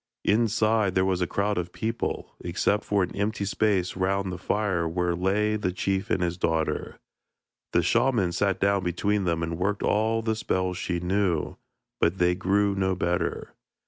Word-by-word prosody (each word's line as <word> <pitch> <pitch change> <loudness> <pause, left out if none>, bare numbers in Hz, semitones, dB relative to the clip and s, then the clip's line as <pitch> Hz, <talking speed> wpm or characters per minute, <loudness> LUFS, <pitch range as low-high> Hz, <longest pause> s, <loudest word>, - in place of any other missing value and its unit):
Inside, 110 -2 +2
there 95 0 +3
was 95 -1 0
a 90 - +1
crowd 100 +1 0
of 90 0 -4
people, 115 +4 -3
except 95 +4 0
for 100 -2 +1
an - - -4
empty 100 0 -1
space 100 -3 +1
round 95 0 0
the 90 - -6
fire 95 -4 0
where 90 +1 0
lay 100 +4 +1
the 95 -3 -1
chief 95 +1 -1
and 90 - +1
his 85 0 -1
daughter. 80 -2 -1 0.7
The 85 - +2
shaman 115 -1 +2
sat 95 +2 0
down 100 -1 +2
between 100 +3 0
them 85 -1 0
and 85 0 -3
worked 100 +2 -1
all 110 +2 +1
the 110 -1 0
spells 95 -4 -1
she 90 -2 -2
knew, 90 -2 0 0.4
but 85 +3 +2
they 90 -1 +3
grew 100 +3 +1
no 95 -1 0
better. 85 0 -2
95 Hz, 175 wpm, -26 LUFS, 90-105 Hz, 0.7 s, there